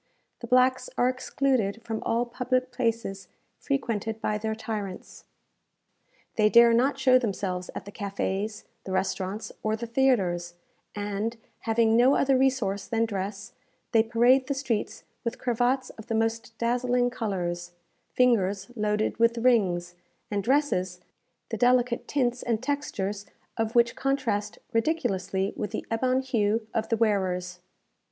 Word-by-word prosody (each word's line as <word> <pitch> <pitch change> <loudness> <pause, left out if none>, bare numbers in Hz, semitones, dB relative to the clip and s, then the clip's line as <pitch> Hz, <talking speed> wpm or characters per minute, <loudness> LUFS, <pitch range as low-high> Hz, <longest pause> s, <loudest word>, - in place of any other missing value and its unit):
The 235 - -7
blacks 255 - +3
are 245 - +4
excluded 255 -4 0
from 225 -2 -4
all 235 +1 0
public 255 +1 -1
places 230 -5 -2 0.3
frequented 225 -5 -2
by 210 -1 -1
their 220 0 -2
tyrants. 210 -4 -6 1.1
They 215 -1 +5
dare 235 +1 +7
not 265 +4 +2
show 260 -1 +5
themselves 190 -5 -3
at - - -6
the 205 - -9
cafés, 200 +1 -3 0.2
the 190 - -5
restaurants, 190 +2 -2
or 215 0 0
the 235 +2 -5
theatres; 195 -9 +1 0.4
and, 205 +3 -3 0.3
having 225 0 +3
no 250 +4 +5
other 275 -1 +3
resource 255 -7 +1
than 225 0 +1
dress, 200 -1 -5 0.4
they 225 - +5
parade 240 +3 +3
the 280 - -1
streets 255 -6 -2 0.2
with 235 - -3
cravats 250 +2 0
of 220 - -12
the 225 - -1
most 225 0 -1
dazzling 245 +1 +1
colours, 175 -7 -3 0.4
fingers 205 -4 +2
loaded 210 0 0
with 230 0 +3
rings, 190 -8 +2 0.4
and 200 -1 -1
dresses 225 -9 +1 0.5
the 225 - -3
delicate 245 +1 +2
tints 250 -3 0
and 230 -1 -1
textures 210 -8 -3 0.3
of 225 0 -2
which 235 0 +4
contrast 235 -7 -1 0.2
ridiculously 200 - 0
with 210 - -3
the - - -5
ebon 255 +3 +1
hue 225 -4 0
of 220 -1 -1
the 230 - +1
wearers. 185 -5 0
225 Hz, 140 wpm, -27 LUFS, 205-250 Hz, 1.1 s, dare